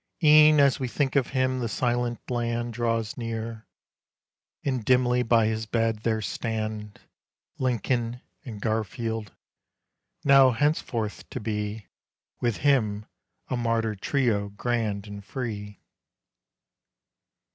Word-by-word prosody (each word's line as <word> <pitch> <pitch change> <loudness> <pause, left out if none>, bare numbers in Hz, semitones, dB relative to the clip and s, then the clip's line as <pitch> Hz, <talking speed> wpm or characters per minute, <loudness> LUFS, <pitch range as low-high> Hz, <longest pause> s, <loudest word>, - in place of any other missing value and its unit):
E'en 150 0 +7
as 140 -2 +4
we 130 - -1
think 135 +2 -1
of 135 -3 +3
him 130 -1 0
the 120 -2 -2
silent 120 0 0
land 120 0 -1
Draws 115 -1 -1
near, 115 -2 -5 1.0
and 130 -4 -1
dimly 125 +1 +3
by 115 -2 +3
his 110 0 -1
bed 115 0 +1
there 110 -1 -1
stand 110 0 -4 0.6
Lincoln 120 -1 0 0.2
and 110 -4 -8
Garfield, 110 0 -2 0.9
now 135 -2 +7
henceforth 120 -5 -1
to - - -5
be 105 -1 -3 0.5
With 120 -4 0
him 110 -7 +2 0.4
a - - -2
martyr 115 -2 0
trio 105 -1 0
grand 105 -1 -2
and 100 -1 -8
free. 105 -3 -5
115 Hz, 115 wpm, -26 LUFS, 110-125 Hz, 1.0 s, E'en